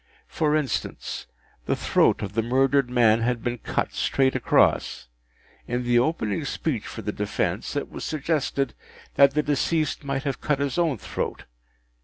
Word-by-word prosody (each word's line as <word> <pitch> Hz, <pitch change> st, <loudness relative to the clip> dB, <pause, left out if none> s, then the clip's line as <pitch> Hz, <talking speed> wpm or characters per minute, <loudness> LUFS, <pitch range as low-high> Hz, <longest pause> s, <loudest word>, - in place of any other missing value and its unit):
For 155 Hz, -1 st, +1 dB
instance: 150 Hz, -6 st, -3 dB, 0.4 s
the -, -, +2 dB
throat -, -, +2 dB
of 100 Hz, 0 st, -5 dB
the 115 Hz, -, +1 dB
murdered 135 Hz, +2 st, +2 dB
man 115 Hz, -2 st, +4 dB
had 120 Hz, 0 st, 0 dB
been 120 Hz, -1 st, -2 dB
cut -, -, -2 dB
straight 135 Hz, -1 st, +1 dB
across. -, -, +2 dB, 0.6 s
In 120 Hz, +1 st, -1 dB
the 120 Hz, 0 st, +3 dB
opening 125 Hz, -3 st, 0 dB
speech 140 Hz, -3 st, -2 dB
for 115 Hz, -, -7 dB
the 105 Hz, -, -2 dB
defence, 105 Hz, +1 st, -2 dB
it 145 Hz, -, -1 dB
was -, -, -7 dB
suggested 150 Hz, -2 st, -1 dB, 0.4 s
that 140 Hz, 0 st, +5 dB
the 150 Hz, -, +2 dB
deceased 150 Hz, +1 st, 0 dB
might 135 Hz, -1 st, -2 dB
have 140 Hz, -4 st, -3 dB
cut 150 Hz, -2 st, +1 dB
his 140 Hz, +1 st, -1 dB
own 160 Hz, -7 st, +1 dB
throat. -, -, -4 dB
135 Hz, 160 wpm, -25 LUFS, 120-145 Hz, 0.6 s, that